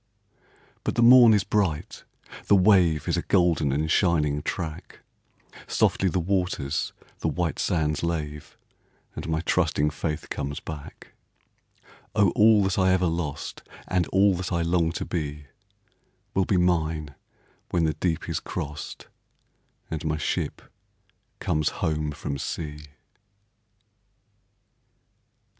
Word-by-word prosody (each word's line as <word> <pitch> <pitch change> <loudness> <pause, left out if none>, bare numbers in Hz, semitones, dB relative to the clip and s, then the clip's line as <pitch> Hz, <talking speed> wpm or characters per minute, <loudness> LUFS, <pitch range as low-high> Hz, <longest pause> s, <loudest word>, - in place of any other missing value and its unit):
But - - -2
the 120 - +3
morn 120 -1 +9
is 105 -2 +3
bright 95 -7 -1 0.4
the 100 - +6
wave 90 -6 +4
Is - - +1
a - - +1
golden 85 -6 +2
and 75 +3 0
shining 75 -6 +2
track, 80 -1 -5 0.7
Softly 95 - +2
the 90 - 0
waters 90 -6 -1 0.3
the - - -1
white 85 +1 -1
sands 75 -3 0
lave, 75 -3 -4 0.6
And - - -6
my 80 0 0
trusting 80 -4 +1
faith 75 0 -4
comes 70 +1 -3
back; 75 -2 -10 1.0
Oh, 100 -4 +4
all 105 -1 +5
that 95 0 0
I 95 0 +4
ever 95 0 +2
lost, 80 -4 -3 0.3
And 90 -1 +1
all 100 +1 +4
that 90 0 -4
I 85 -1 +1
long 85 -1 +1
to - - -4
be, 75 -3 -4 0.9
Will 95 -1 +2
be 95 - +1
mine 80 -4 0 0.6
when 85 - +1
the 80 -1 +1
deep 85 -1 -2
is - - -2
crossed, 75 0 -6 0.9
And 80 -2 -3
my 80 -1 -1
ship 75 - -2 0.8
comes 75 -1 0
home 75 -1 -2
from 70 -1 -5
sea. 75 +1 -5
80 Hz, 125 wpm, -25 LUFS, 75-90 Hz, 1.0 s, morn